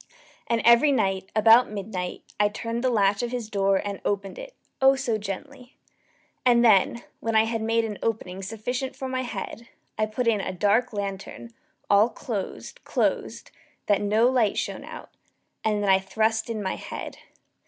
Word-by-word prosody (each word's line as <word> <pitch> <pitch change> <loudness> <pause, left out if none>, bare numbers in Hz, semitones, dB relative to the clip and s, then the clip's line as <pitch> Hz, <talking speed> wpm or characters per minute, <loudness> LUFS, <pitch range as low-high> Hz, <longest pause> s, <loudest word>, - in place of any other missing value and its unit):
And 230 -1 0
every 235 +5 +6
night, 195 -6 0
about 225 +3 +6
midnight, 195 -3 -5 0.2
I 205 0 +4
turned 230 +3 -4
the 255 - +3
latch 200 -4 +2
of 240 - -2
his 235 -3 -5
door 195 -1 +2
and 200 -1 -5
opened 200 -1 -2
it - - -10 0.3
oh 270 0 +6
so 240 -5 -1
gently! 210 +5 -8 0.7
And 240 -1 +5
then, 220 +2 +4 0.2
when 225 -1 -2
I 220 - +6
had 225 0 -2
made 225 +1 +1
an 210 -2 -6
opening 195 -4 -3
sufficient 245 +6 -4
for 265 - -5
my 260 0 -2
head, 235 -2 -6 0.3
I 215 - +2
put 230 +3 -2
in 215 -3 +2
a - - -4
dark 210 +6 +2
lantern, 200 +3 -6 0.3
all 205 +3 +5
closed, 215 -5 -6
closed, - - -1 0.3
that 205 -1 +2
no 215 +3 +3
light 245 -5 +2
shone - - -3
out, - - -10 0.5
and 210 -1 0
then 200 - +1
I 190 - +5
thrust 220 +3 0
in 220 -2 -3
my 190 - -2
head. - - -7
220 Hz, 175 wpm, -25 LUFS, 200-235 Hz, 0.7 s, every